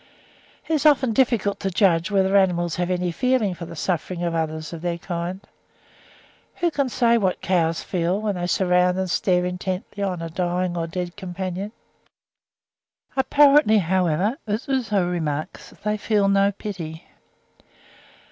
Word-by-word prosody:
It 320 - -1
is 310 0 +3
often 265 -5 +3
difficult 230 -5 +1
to 195 - -1
judge 180 -3 +2
whether 195 -1 +2
animals 175 -4 +2
have 175 0 -1
any 180 -1 0
feeling 250 -1 +1
for 170 -1 -8
the 165 - -9
sufferings 175 +1 -2
of 170 -1 -1
others 160 0 -3
of 165 - -7
their 175 -1 -2
kind. 175 +2 -5 1.1
Who 345 -1 0
can 280 -3 0
say 235 -1 +3
what 190 -3 0
cows 165 -3 +1
feel, 180 +1 -1
when 215 -1 -1
they 175 -1 -3
surround 180 0 +2
and 190 -2 -1
stare 180 -2 +2
intently 185 +2 -4
on 185 -4 -2
a 165 - -4
dying 180 +1 -1
or 165 -1 -2
dead 175 +1 -5
companion; 190 +1 -5 1.4
apparently, 275 -3 +5
however, 185 - +1
as 210 +2 -2
Houzeau 220 -9 0
remarks, 155 -4 -3
they 210 +1 0
feel 205 -1 +1
no 200 0 +3
pity. 175 -5 -7
185 Hz, 150 wpm, -23 LUFS, 175-210 Hz, 1.4 s, apparently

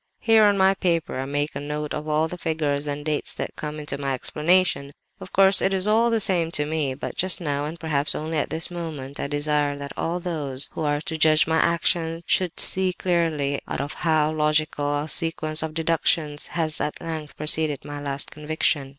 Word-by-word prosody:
"Here 225 -2 +5
on 205 -1 +4
my 190 0 +5
paper, 170 -7 -1
I 135 - -2
make 145 +2 -2
a - - -2
note 150 +1 -4
of 150 +1 -4
all 155 +1 +1
the 180 - -6
figures 150 -4 -1
and 145 0 -3
dates 150 -1 -2
that - - -5
come 150 0 -5
into 145 -2 -4
my 135 -1 -1
explanation. 150 0 +1 0.3
Of 185 - -10
course, 195 0 +5
it 195 - +2
is 190 +1 +3
all 225 +2 +4
the 230 -1 +2
same 180 -5 +2
to 150 - +2
me, 150 -3 -1
but 140 - -6
just 185 0 0
now—and 150 0 -3
perhaps 150 -3 +1
only 155 0 -2
at - - -1
this 160 +3 +1
moment—I 150 -6 -5
desire 145 0 0
that 140 0 -7
all 170 +2 -2
those 145 -6 -2
who - - -6
are 145 -1 0
to 165 -1 -4
judge 155 0 +5
of - - -7
my 160 0 +3
action 170 0 +1
should 180 -2 0
see 185 -1 +2
clearly 165 -6 0
out - - -3
of 145 +2 -3
how 155 -2 +1
logical 150 -1 0
a - - -6
sequence 160 -1 -1
of 160 -1 -4
deductions 160 -2 +1
has 155 -2 +2
at 150 - -2
length 155 -3 -6
proceeded 155 -1 +1
my 145 0 -6
'last 140 -1 -2
conviction. 150 -2 -1
155 Hz, 205 wpm, -24 LUFS, 145-170 Hz, 0.3 s, Here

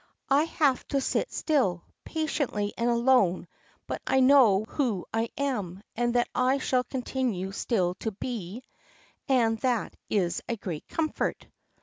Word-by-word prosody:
I 285 +3 +5
have 290 -5 +1
to 280 - 0
sit 275 - -1
still, 220 - +1 0.2
patiently 280 -10 -2
and 235 +1 0
alone; 235 -8 +3 0.4
but - - -4
I 265 - +3
know 255 -7 +6
who 235 - -1
I 225 +1 0
am, 205 -10 -2
and 240 +1 0
that 240 - +3
I 255 +2 +2
shall 255 -2 +1
continue 245 -6 -2
still 190 -3 0
to 220 - -2
be, 220 +1 -6 0.7
and 230 -4 +3
that 245 -3 0
is 180 -5 0
a 235 - 0
great 170 -7 -6
comfort." 315 -1 -2
240 Hz, 140 wpm, -28 LUFS, 200-265 Hz, 0.7 s, know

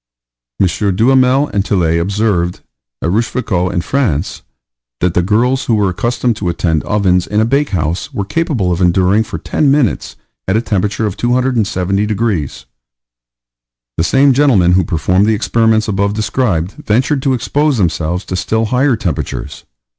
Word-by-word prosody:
M. - - +4 0.3
Duhamel 130 +5 +3
and 100 -1 -1
Tillet 85 -5 +1
observed, 95 -2 -1 0.4
at 85 - 0
Rochefoucault 105 -4 -1
in 85 - -1
France, 100 - -1 0.6
that 90 -1 0
the 90 - +2
girls 120 +8 +1
who 115 - +1
were 105 -3 +1
accustomed 120 +5 -1
to 95 -5 -2
attend 85 -2 0
ovens 95 -4 +1
in 105 - 0
a 110 - +3
bakehouse, 95 - -1
were 100 - -3
capable 130 - -1
of 85 +1 -1
enduring 95 +3 +3
for 110 - -6
ten 145 - 0
minutes 140 -5 0 0.3
a 95 +4 +2
temperature 105 -1 -1
of 100 -2 -3
270 110 -5 0
degrees. 105 -9 -2 1.3
The 80 - 0
same 135 +7 +3
gentleman 125 -11 +3
who 90 +1 +3
performed 90 +5 +1
the 110 - +2
experiments 110 0 +1
above 100 0 0
described 105 -6 -1
ventured 130 +6 +1
to 135 -1 +1
expose 145 +3 0
themselves 85 -1 -1
to 95 - -4
still 110 +6 -1
higher 130 +3 +1
temperatures. 90 -9 -4
105 Hz, 150 wpm, -14 LUFS, 90-120 Hz, 1.3 s, M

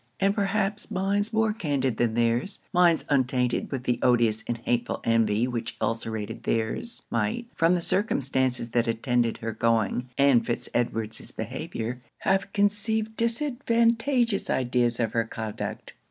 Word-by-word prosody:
And 195 +1 +3
perhaps 205 0 -1
minds 200 +2 0
more 220 -1 +2
candid 140 - -1
than 115 -2 +1
their's 120 - +1
minds 175 -2 +4
untainted 125 -3 +1
with 130 -3 -3
the 125 -1 0
odious 115 -3 +3
and 120 - -1
hateful 120 +1 -1
envy 115 0 +2
which 115 -2 -4
ulcerated 110 -2 -3
their's, 115 - -2
might, 115 - -1
from 165 +2 +3
the 175 - -1
circumstances 130 - 0
that 120 0 +1
attended 115 0 0
her 115 0 -4
going 115 +2 0
and 140 -4 +5
Fitz 120 - -2
Edward's 115 -2 -1
behaviour, 120 +3 -5 0.2
have 195 +1 +1
conceived 215 +2 0
disadvantageous 235 -1 +1
ideas 120 -2 +1
of 115 -2 0
her 115 - +2
conduct. 110 -2 -6
125 Hz, 140 wpm, -26 LUFS, -, 0.2 s, and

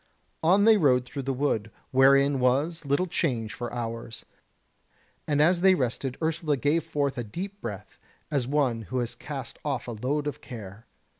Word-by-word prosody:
On 185 +5 +4
they 220 -1 +7
rode 130 -8 +3
through 140 +2 -5
the 135 +1 -2
wood, 125 -5 0 0.2
wherein 140 +1 +5
was 145 +6 +1
little 140 +6 +1
change 125 -11 -1
for 120 -1 -5
hours; 115 -1 -5 1.0
and 145 -1 +1
as 170 +3 +4
they 190 0 +6
rested 130 -2 -2
Ursula 160 -2 0
gave 145 +5 +1
forth 145 -4 -1
a - - -2
deep 190 - -7
breath, 105 -3 -7 0.3
as 135 -5 0
one 135 -5 +1
who 130 - -2
has 120 -2 -1
cast 140 -3 -7
off 140 -5 -2
a - - -3
load 135 +7 -2
of 150 0 -4
care. 110 -3 -10
140 Hz, 170 wpm, -27 LUFS, 120-150 Hz, 1.0 s, they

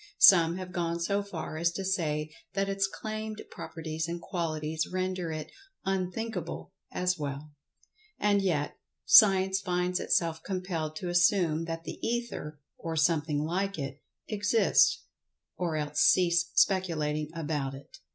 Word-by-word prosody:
Some 170 -3 +7
have 185 -1 -7
gone 170 -2 -2
so 200 +4 0
far 170 -6 -6
as 170 +1 +2
to 195 - -4
say 155 -5 -1 0.2
that 195 0 0
its 195 0 +1
claimed 215 +1 -6
properties 160 -1 -5
and 170 +1 -4
qualities 160 -3 -2
render 185 -2 -2
it 155 -1 -6 0.3
"unthinkable" 190 0 -3 0.2
as 180 -1 0
well. 145 +1 -5 0.7
And 205 -1 +2
yet, 160 -7 -1 0.3
Science 190 -3 +7
finds 180 -1 -1
itself 165 -2 +1
compelled 175 -4 -3
to 180 +2 -4
assume 175 -2 +3
that 165 0 -5
the - - -7
Ether, 230 -11 -3 0.2
or 165 -1 -4
"something 150 -2 +1
like 190 +4 -1
it" 135 -1 -5 0.3
exists, 210 +1 +3 0.5
or 170 -3 -2
else 150 -1 -2
cease 170 -2 +4
speculating 155 -6 +1
about 145 -4 -2
it. 135 +1 -14
170 Hz, 135 wpm, -29 LUFS, 155-190 Hz, 0.7 s, Some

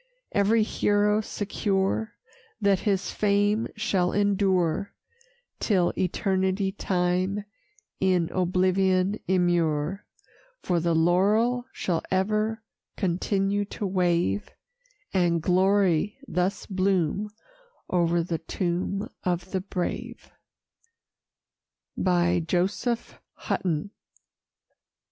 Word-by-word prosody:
Every 215 +2 +3
hero 210 0 +2
secure 205 +1 -1 0.5
That 200 -3 +3
his 195 -1 0
fame 205 +2 +1
shall 195 -5 +1
endure 195 -3 +1 0.6
Till 185 -5 +2
eternity 190 +1 0
time 185 +1 -1 0.5
in 185 -3 +2
oblivion 185 +2 +2
immure; 175 -1 +1 0.6
For 175 -1 +1
the 165 0 +1
laurel 210 +9 +3
shall 170 -3 -1
ever 215 +4 0 0.3
continue 195 +2 0
to 205 - -5
wave, 175 - +1 0.6
And 175 -3 +2
glory 190 +1 +2
thus 185 +2 -1
bloom 190 0 0 0.6
o'er 170 -1 +2
the 165 -1 -3
tomb 180 +3 -2 0.2
of 180 0 -2
the 190 - -1
brave. 185 -2 -5 1.6
JOSEPH 180 +6 0 0.2
HUTTON. 175 +1 -2
190 Hz, 80 wpm, -26 LUFS, 175-205 Hz, 1.6 s, Every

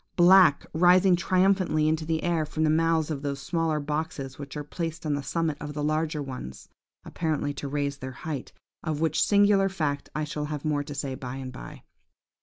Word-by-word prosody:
Black 175 -4 +6
rising 180 +2 +5
triumphantly 185 -3 +2
into 155 0 0
the 160 0 -1
air 170 -2 +1
from 155 +1 -2
the 155 - +3
mouths 160 0 +2
of 140 -3 -3
those 140 -1 -3
smaller 160 +2 -1
boxes, 145 -3 -4
which 140 +1 -7
are 150 - -4
placed 165 +2 -5
on 150 - 0
the 145 - -1
summit 160 +1 -1
of 150 0 -6
the 150 - -2
larger 155 0 0
ones, 125 - -8 0.4
apparently 155 -3 -2
to 140 0 -5
raise 140 0 -2
their 130 -1 -6
height–of 155 +1 -6
which 160 0 +1
singular 200 -1 +4
fact 150 -6 -2
I 155 - -1
shall 150 0 -3
have 150 0 -5
more 145 -2 0
to 145 - -7
say 140 -1 -3
by 130 0 -6
and 130 -1 -6
by. - - -10
155 Hz, 195 wpm, -27 LUFS, 145-165 Hz, 0.4 s, Black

